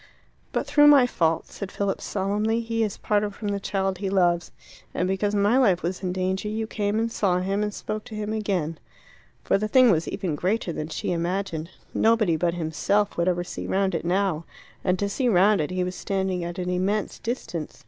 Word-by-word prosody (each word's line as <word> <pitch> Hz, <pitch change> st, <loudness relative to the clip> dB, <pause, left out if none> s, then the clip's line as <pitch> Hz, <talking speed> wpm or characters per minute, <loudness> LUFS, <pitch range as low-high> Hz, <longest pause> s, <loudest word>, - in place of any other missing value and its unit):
"But -, -, -1 dB
through 295 Hz, 0 st, +5 dB
my 285 Hz, -4 st, +8 dB
fault," 165 Hz, -8 st, +1 dB
said 200 Hz, -2 st, -7 dB
Philip 200 Hz, -1 st, -2 dB
solemnly, 210 Hz, +3 st, 0 dB
"he 230 Hz, 0 st, -2 dB
is 210 Hz, -3 st, -1 dB
parted 205 Hz, -1 st, 0 dB
from 210 Hz, -, -4 dB
the 200 Hz, 0 st, -1 dB
child 195 Hz, -2 st, -1 dB
he 195 Hz, -1 st, -2 dB
loves. 175 Hz, -3 st, +2 dB, 0.4 s
And 180 Hz, -, 0 dB
because 200 Hz, +2 st, 0 dB
my 205 Hz, +5 st, +3 dB
life 195 Hz, -9 st, +3 dB
was 180 Hz, +2 st, -2 dB
in 185 Hz, -2 st, -2 dB
danger 185 Hz, +2 st, -1 dB
you 220 Hz, +1 st, -2 dB
came 210 Hz, -1 st, -1 dB
and 230 Hz, +1 st, 0 dB
saw 190 Hz, -5 st, +1 dB
him 195 Hz, +3 st, -1 dB
and 210 Hz, 0 st, -1 dB
spoke 215 Hz, +1 st, -5 dB
to 220 Hz, -, -8 dB
him 215 Hz, 0 st, -3 dB
again." 185 Hz, -7 st, -1 dB, 0.6 s
For -, -, +2 dB
the 215 Hz, -, -1 dB
thing 255 Hz, 0 st, +6 dB
was 165 Hz, -2 st, +1 dB
even 180 Hz, -5 st, -2 dB
greater 185 Hz, +3 st, -1 dB
than 155 Hz, -, -4 dB
she 160 Hz, -, -3 dB
imagined. 170 Hz, -1 st, -2 dB, 0.2 s
Nobody 220 Hz, -6 st, +3 dB
but 170 Hz, +2 st, 0 dB
himself 185 Hz, +5 st, 0 dB
would 170 Hz, +1 st, 0 dB
ever 175 Hz, -1 st, +1 dB
see -, -, -6 dB
round 195 Hz, 0 st, +1 dB
it 165 Hz, -, -2 dB
now. 175 Hz, -2 st, 0 dB, 0.4 s
And 180 Hz, 0 st, +2 dB
to 200 Hz, -, -1 dB
see 245 Hz, +5 st, 0 dB
round 200 Hz, -1 st, +4 dB
it 150 Hz, -, -2 dB
he 185 Hz, 0 st, -1 dB
was 180 Hz, 0 st, -3 dB
standing 190 Hz, -1 st, -2 dB
at 175 Hz, +2 st, -5 dB
an 180 Hz, 0 st, -2 dB
immense 195 Hz, +3 st, -1 dB
distance. 200 Hz, -, -5 dB
195 Hz, 210 wpm, -25 LUFS, 180-210 Hz, 0.6 s, my